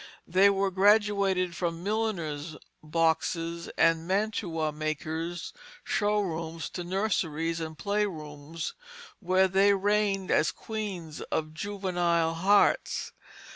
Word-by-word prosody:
They 190 +3 +5
were 195 0 +1
graduated 195 -2 +3
from 170 0 -3
milliners' 170 -8 -2 0.2
boxes 165 +1 0
and 165 0 +3
mantua 185 -6 0
makers' 155 +3 -4 0.3
show 210 0 +1
rooms 165 -3 -4
to 180 - -5
nurseries 165 -4 -1
and 160 -1 -5
play 205 +3 0
rooms 155 -2 -6 0.5
where 190 0 +3
they 195 +2 +4
reigned 200 -1 +1
as 155 - +3
queens 195 -8 -6
of 155 0 -1
juvenile 175 -3 0
hearts. 195 +5 +2
175 Hz, 105 wpm, -28 LUFS, 160-200 Hz, 0.5 s, They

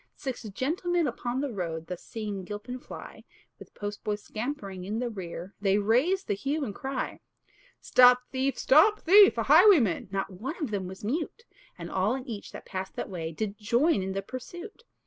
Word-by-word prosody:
Six 265 -3 -5
gentlemen 335 - 0
upon 245 0 -2
the 285 -2 -2
road, 165 -4 -4
Thus 180 +1 -6
seeing 210 -4 -5
Gilpin 210 +6 -6
fly, - - -10 0.4
With - - -14
postboy 205 0 -3
scampering 210 -3 -5
in 205 +4 -3
the 240 0 -2
rear, 185 -1 -7
They 195 0 +3
raised 255 - +2
the - - 0
hue 280 +9 -2
and 205 - -5
cry: 270 +4 -4 0.6
"Stop 250 0 +6
thief! 265 +1 0
stop 360 +11 +5
thief! 390 - +7
a 230 - +1
highwayman!" 300 - +5
Not 195 0 -3
one 240 - -5
of 295 -9 -3
them 195 -3 -2
was 190 +2 -10
mute; 315 - -3 0.3
And - - -7
all 195 +6 +1
and 265 +1 -7
each 215 -4 -6
that - - -10
passed 190 0 -5
that - - -5
way 165 -3 -4
Did 205 +5 -4
join 235 - +2
in 190 0 -3
the 195 0 -3
pursuit. 350 - -9
230 Hz, 185 wpm, -28 LUFS, 195-280 Hz, 0.6 s, thief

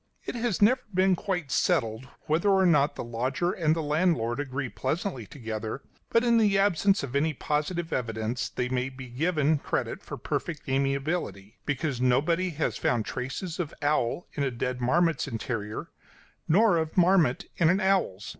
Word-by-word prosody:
It - - -3
has 235 -5 0
never 255 +5 +5
been 185 0 +3
quite 175 -6 -3
settled 130 -7 +1
whether 165 +6 +1
or 190 -1 +4
not 150 -4 +3
the - - -4
lodger 130 +9 -1
and 160 -3 +1
the 165 - -2
landlord 150 -6 +1
agree 135 -2 -3
pleasantly 135 - -3
together, 110 -1 -5 0.3
but 230 - +3
in 235 -1 +4
the 205 -3 +3
absence 195 -1 +3
of 135 -1 -5
any 155 +2 +1
positive 160 +5 -2
evidence 115 0 -2
they 125 - -2
may 125 +1 -1
be 130 -1 -10
given 155 +2 +1
credit - - -2
for - - -7
perfect - - -4
amiability; 135 - -2
because 140 -3 -1
nobody 155 +9 +2
has 155 -2 -2
found 115 -3 0
traces 160 +8 -4
of 165 -4 -3
owl 145 +1 +1
in 145 - -3
a 140 - +1
dead 125 +1 -3
marmot's 165 +6 +2
interior, 110 -2 -4 0.6
nor 195 +2 +4
of 160 +1 -2
marmot 175 -7 +4
in 165 -2 +4
an 185 +3 +3
owl's. 190 - +1
150 Hz, 165 wpm, -27 LUFS, 125-180 Hz, 0.6 s, never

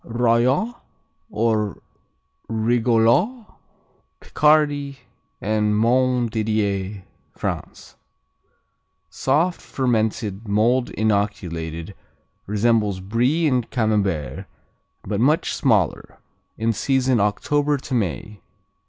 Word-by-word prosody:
Rollot 125 - +1 0.5
or 110 -2 0 0.7
Rigolot 120 - +2 0.7
Picardy 145 -2 +2 0.4
and 105 0 0
Montdidier, 110 -5 0 0.3
France - - -5 1.2
Soft; 160 - 0
fermented; 110 -4 -1
mold 115 +5 +2
inoculated; 95 -5 -2 0.5
resembles 105 -1 +1
Brie 120 - +1
and 125 -6 +1
Camembert, 95 - -1 0.6
but 105 -2 -3
much 150 +7 +2
smaller. - - 0 0.4
In 115 +1 0
season 130 +1 +1
October 145 +8 +1
to 130 - -7
May. 105 - -2
115 Hz, 75 wpm, -22 LUFS, 105-130 Hz, 1.2 s, Rigolot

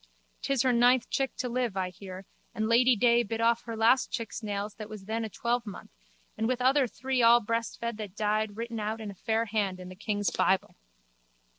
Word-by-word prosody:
'Tis 275 -3 +1
her 255 -1 +3
ninth 245 +1 +4
chick 270 -1 -1
to 250 - -3
live, 240 -4 -2
I 185 -1 -1
hear, 185 +1 -10 0.3
and 220 0 -1
Lady 245 +2 +5
day 235 +2 +4
bit 225 0 -4
off 235 +1 +2
her 230 -1 -5
last 235 +4 +4
chick's 230 -1 -4
nails 205 -1 -3
that 215 0 -7
was 210 -3 -9
then 225 +2 -2
a 220 - -4
twelvemonth 235 -2 -3 0.4
and 225 - -1
with 255 0 0
other 260 +1 +3
three 260 +2 -2
all 235 +1 +7
breastfed 230 0 -3
that 210 -3 -7
died 215 0 -1
written 230 0 -4
out 215 +1 -3
in 215 -2 -6
a - - -10
fair 220 +4 -1
hand 200 -4 -1
in 180 0 -9
the 185 - -10
king's 205 0 -1
bible. 190 0 +1
225 Hz, 205 wpm, -29 LUFS, 210-240 Hz, 0.4 s, all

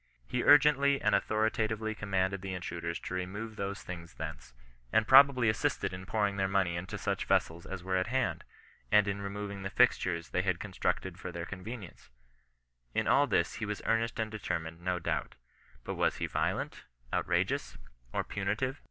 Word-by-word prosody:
He 125 - -1
urgently 140 -1 +6
and - - +2
authori 110 +1 +2
tatively 110 0 -1
commanded 95 -2 -1
the 95 -1 -4
intruders 85 -1 -4
to - - -6
remove 100 +5 -4
those 100 +2 -4
things 85 -2 -8
thence, - - -7 0.4
and 110 - +3
probably 135 -2 +7
assisted 110 -3 0
in 95 +1 -7
pouring 105 -2 0
their 95 -1 +2
money 95 -3 +1
into 90 +2 -4
such - - -2
vessels 85 +1 +1
as 95 -2 -6
were 95 0 0
at 95 - 0
hand, 120 - 0 0.5
and 105 -1 +6
in 100 0 -2
removing 100 0 -5
the 95 - -3
fixtures 95 -7 +2
they 90 - +1
had 95 -2 0
constructed 100 -3 -2
for - - -6
their - - -5
convenience 100 0 -8 0.9
In - - +1
all 145 +1 +5
this 85 - +1
he 110 - -3
was 105 0 -4
earnest 115 +1 +1
and 110 -1 -1
determined, 85 -6 -4
no 90 0 0
doubt. 85 - -2 0.5
But - - -4
was - - +1
he - - -2
violent, - - -2 0.3
outrageous, - - 0 0.3
or - - -1
punitive 110 +8 -2
100 Hz, 175 wpm, -31 LUFS, 90-110 Hz, 0.9 s, probably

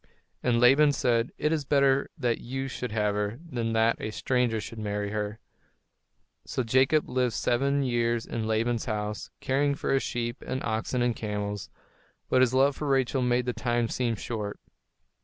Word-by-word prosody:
And 120 -2 +2
Laban 140 +4 +6
said, 120 -3 +1
"It 150 - 0
is 155 -2 0
better 140 -1 +3
that 120 -5 0
you 135 +2 -4
should 125 -2 -5
have 105 -1 +1
her, 105 +2 -2
than 115 -6 -2
that 115 +1 +2
a - - -3
stranger 120 0 0
should 110 +1 -7
marry 105 -1 -2
her." 105 0 -3 1.1
So 130 - -2
Jacob 130 +6 +3
lived 125 -3 0
seven 140 +3 +1
years 120 -2 0
in 110 -2 -3
Laban's 115 +1 0
house, 105 -2 -3
caring 140 +2 +1
for - - -1
his 135 - +3
sheep 120 0 -3
and 130 +1 -3
oxen 115 +3 -1
and 120 -1 +1
camels; 105 -1 -4 0.6
but 130 - +4
his 130 -2 +4
love 135 +1 +4
for 150 - -4
Rachel 135 -1 +2
made 125 0 +1
the 125 - -1
time 120 -1 0
seem 120 -3 0
short. 105 -1 -5
120 Hz, 175 wpm, -28 LUFS, 110-130 Hz, 1.1 s, Laban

